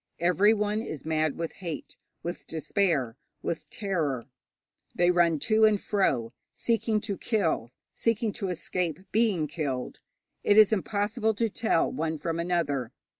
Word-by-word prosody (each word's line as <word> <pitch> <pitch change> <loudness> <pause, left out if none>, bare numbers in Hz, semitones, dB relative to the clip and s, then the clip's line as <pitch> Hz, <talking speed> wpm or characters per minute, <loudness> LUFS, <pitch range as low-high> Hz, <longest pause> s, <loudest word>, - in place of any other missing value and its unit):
Everyone 205 +4 +3
is 155 - -6
mad 155 -2 0
with 165 -1 -3
hate, 170 -5 -6 0.3
with 175 +1 -5
despair, 160 - 0 0.3
with 165 - -3
terror. 155 - -2 0.7
They 175 0 +4
run 170 -2 +3
to 220 0 +3
and 215 -2 +5
fro, 130 - 0 0.2
seeking 225 -1 0
to 205 -3 -4
kill, 180 - 0 0.2
seeking 230 -1 0
to 200 -1 -4
escape 180 -1 -2
being 210 -8 +2
killed. 140 -4 -3 0.4
It 205 - +4
is 215 0 +8
impossible 210 +3 0
to 225 0 0
tell 220 -7 +1
one 160 0 -2
from 165 +2 -3
another. 165 -8 0
180 Hz, 135 wpm, -28 LUFS, 160-215 Hz, 0.7 s, is